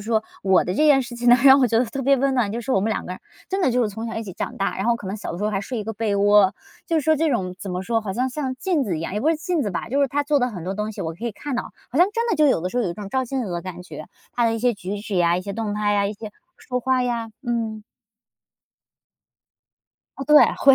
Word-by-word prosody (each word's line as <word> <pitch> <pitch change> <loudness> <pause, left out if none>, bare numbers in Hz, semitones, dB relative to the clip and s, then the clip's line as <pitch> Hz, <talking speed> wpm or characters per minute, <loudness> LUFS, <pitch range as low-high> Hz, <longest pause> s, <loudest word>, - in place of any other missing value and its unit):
说， 220 -1 +1 0.2
我 190 -2 +4
的 180 - -2
这 - - -5
件 285 -3 +6
事 240 -2 -6
情 240 0 0
呢 245 - +8
让 270 0 +8
我 255 - +5
觉 225 0 +2
得 250 - +3
特 270 +4 -5
别 275 +1 +4
温 270 +1 +1
暖， 235 -5 +1
就 235 +3 -3
是 250 +3 -3
我 195 - +3
们 220 +3 0
两 - - -4
个 180 - -5
人， - - -9 0.3
真 385 +1 -1
的 260 - +3
就 250 - +1
是 230 - +1
从 220 +3 -6
小 225 - -5
一 225 - -3
起 190 - -7
长 - - -5
大， 195 - -1
然 195 - -2
后 235 0 +2
可 205 - -9
能 195 - -3
小 210 - -6
的 170 - -5
时 205 - -2
候 210 - +1
还 195 -2 -1
睡 240 +3 -5
一 210 - -4
个 225 - -4
被 215 -1 -1
窝。 205 -1 +5 0.4
就 330 - +1
是 - - +3
说 315 - +4
这 315 +1 +1
种 185 -8 -1
怎 195 - -5
么 180 +1 -3
说， 225 +3 0
好 205 -3 -4
像 255 +5 0
像 260 -1 -4
镜 360 -4 0
子 185 -9 -2
一 - - -5
样， 165 +3 -4
也 210 - -1
不 310 - +1
是 325 - +1
镜 335 -1 -1
子 205 - -2
吧。 180 - -4
就 275 +4 0
是 280 - +3
她 290 +2 -1
做 290 -1 +2
的 250 - +2
很 180 -8 -7
多 190 +2 -3
东 210 +2 -3
西， - - -8
我 165 0 -3
可 200 +8 -9
以 235 - -1
看 270 +6 -6
到。 240 - -4 0.2
好 255 - -6
像 355 - +7
真 465 +1 -1
的 - - +2
就 305 -1 +4
有 170 - +2
的 180 - -2
时 245 - -6
候， 245 - +2
有 180 - -1
一 - - -3
种 205 +1 -7
照 260 +5 0
镜 260 0 -3
子 195 - -5
的 170 -1 -3
感 180 -2 -7
觉， - - -9 0.2
她 240 - +1
的 230 - +2
一 - - -2
些 245 +1 +2
举 200 +1 -5
止 210 -1 -5
呀， 175 -1 +3
一 180 - -2
些 200 - -5
动 215 0 -3
态 210 0 0
呀， 200 -1 +2
一 205 - -3
些 210 0 -9 0.2
说 250 -1 -4
话 260 +1 +1
呀， 235 -2 -2 0.2
嗯。 225 -2 -2 2.3
哦， 270 - -5
对， 300 +2 +6 0.2
会。 275 0 +6
225 Hz, 350 characters per minute, -23 LUFS, 200-260 Hz, 2.3 s, 呢